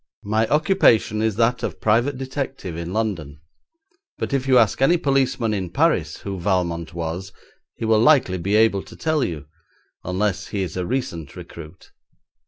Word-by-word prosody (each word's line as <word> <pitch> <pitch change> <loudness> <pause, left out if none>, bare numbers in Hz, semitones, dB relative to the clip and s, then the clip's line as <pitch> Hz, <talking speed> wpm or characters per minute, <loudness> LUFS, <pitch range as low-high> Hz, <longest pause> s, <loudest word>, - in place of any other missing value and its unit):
My 110 +2 +1
occupation 150 - +3
is 110 -2 0
that 115 +2 +1
of - - -4
private 120 +6 +2
detective 135 - -5
in 85 +1 -5
London, 90 -10 -3 0.8
but - - -4
if 135 -1 0
you 130 -1 +5
ask 115 +1 +3
any 170 +6 +5
policeman 135 -6 +1
in 95 -4 -3
Paris 95 - +1
who 100 -2 -5
Valmont 85 -3 -1
was 85 +3 -4 0.4
he - - -4
will 110 -1 +4
likely 125 -10 +4
be 100 +5 0
able 110 -3 +4
to - - -13
tell 155 -3 0
you, 75 -5 -4 0.6
unless 95 +2 -1
he 100 -3 -2
is 90 - -6
a 90 -1 -2
recent 85 - -3
recruit. 85 +1 -11
105 Hz, 165 wpm, -22 LUFS, 90-130 Hz, 0.8 s, you